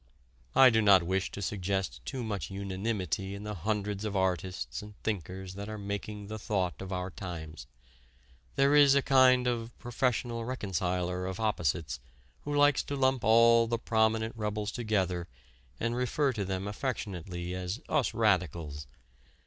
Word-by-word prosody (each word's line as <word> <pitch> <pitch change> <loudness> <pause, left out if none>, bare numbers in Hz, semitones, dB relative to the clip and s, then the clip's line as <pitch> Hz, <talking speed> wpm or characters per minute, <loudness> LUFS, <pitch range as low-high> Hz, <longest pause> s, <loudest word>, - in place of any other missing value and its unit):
I 130 -2 +8
do 110 -1 +3
not 100 -4 +6
wish 95 +2 0
to 100 - -6
suggest 95 0 -2
too 130 -2 -4
much 105 -3 -3
unanimity 95 -1 -3
in 100 - -8
the 105 0 -4
hundreds 105 +2 -2
of 105 -2 -3
artists 95 -1 -1
and 105 0 -11
thinkers 95 -2 -4
that 100 +2 -6
are 110 - -5
making 100 +1 -5
the 110 +1 -6
thought 95 -4 -1
of 95 0 -6
our 90 0 -3
times. 80 -5 -7 0.9
There 140 +1 +4
is 145 -2 +7
a 140 - +3
kind 130 -2 +5
of 120 -1 -2
"professional 120 -1 -1
reconciler" 90 -6 -2
of 95 +1 -5
opposites 85 - -1 0.5
who 145 0 -2
likes 145 -1 +5
to 140 - -3
lump 130 -2 +2
all 115 +1 +6
the 115 +1 0
prominent 110 0 +1
rebels 105 -1 -2
together 95 -7 -1 0.5
and 115 +1 -1
refer 130 +3 +1
to 105 -3 -2
them 95 +1 -3
affectionately 95 - -4
as 90 +4 -3
"us 145 -5 +1
radicals." 85 - 0
105 Hz, 155 wpm, -30 LUFS, 95-115 Hz, 0.9 s, I